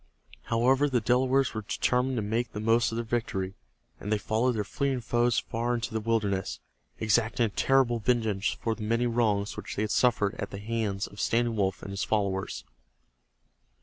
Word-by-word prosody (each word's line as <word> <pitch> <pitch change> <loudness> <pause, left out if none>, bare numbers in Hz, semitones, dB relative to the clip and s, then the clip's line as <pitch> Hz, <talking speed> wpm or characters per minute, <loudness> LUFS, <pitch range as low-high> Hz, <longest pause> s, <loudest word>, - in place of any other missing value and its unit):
However, 130 +5 +3
the 125 -2 +2
Delawares 130 +3 +2
were 110 - -3
determined 125 +5 0
to 110 - -1
make 115 +3 -1
the 105 - -4
most 115 +2 +2
of - - -4
their 115 0 -2
victory, 100 -5 -2 0.5
and 105 - -5
they 110 - +3
followed 115 +5 +1
their 105 -2 -1
fleeing 135 +5 -1
foes 120 0 +1
far 120 +2 -1
into 115 -2 -4
the 110 - 0
wilderness, 100 - -1 0.4
exacting 110 +2 +2
a - - -1
terrible 125 +1 +2
vengeance 110 -3 +1
for 115 - -1
the 110 - -9
many 115 +3 +1
wrongs 110 -4 +1
which - - -6
they 105 - 0
had 105 - -2
suffered 115 -5 +2
at - - -3
the 100 - -7
hands 105 -2 -2
of 100 - -12
Standing 115 0 +1
Wolf 95 -3 -1
and 100 - -6
his 100 0 -2
followers. 95 - -1
115 Hz, 185 wpm, -28 LUFS, 105-120 Hz, 0.5 s, However